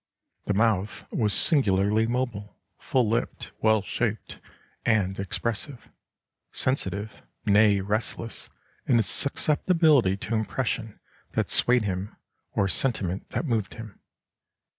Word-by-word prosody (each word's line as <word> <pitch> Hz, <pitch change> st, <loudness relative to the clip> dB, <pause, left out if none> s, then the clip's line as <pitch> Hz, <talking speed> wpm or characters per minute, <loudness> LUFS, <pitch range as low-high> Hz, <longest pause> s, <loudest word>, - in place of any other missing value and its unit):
The 105 Hz, -, 0 dB
mouth 105 Hz, -2 st, +1 dB
was 105 Hz, -3 st, +1 dB
singularly 105 Hz, -, +3 dB
mobile, 120 Hz, -4 st, -3 dB, 0.2 s
full 125 Hz, -4 st, +1 dB
lipped, 115 Hz, +2 st, -2 dB
well 110 Hz, -2 st, +3 dB
shaped, 110 Hz, 0 st, -3 dB, 0.4 s
and 95 Hz, -4 st, +1 dB
expressive; 115 Hz, +6 st, -4 dB, 0.6 s
sensitive, 105 Hz, -5 st, -2 dB, 0.2 s
nay 105 Hz, -1 st, +5 dB
restless, 110 Hz, +3 st, -3 dB, 0.4 s
in 125 Hz, -, +4 dB
its 115 Hz, -, +2 dB
susceptibility 150 Hz, -, +2 dB
to 105 Hz, -, -5 dB
impression 110 Hz, 0 st, -2 dB, 0.3 s
that -, -, -1 dB
swayed 125 Hz, -1 st, +3 dB
him, 95 Hz, 0 st, -3 dB, 0.4 s
or 100 Hz, -, +2 dB
sentiment 95 Hz, -4 st, -1 dB
that -, -, -2 dB
moved 115 Hz, -7 st, -1 dB
him. 110 Hz, -3 st, -10 dB
110 Hz, 110 wpm, -26 LUFS, 100-120 Hz, 0.6 s, nay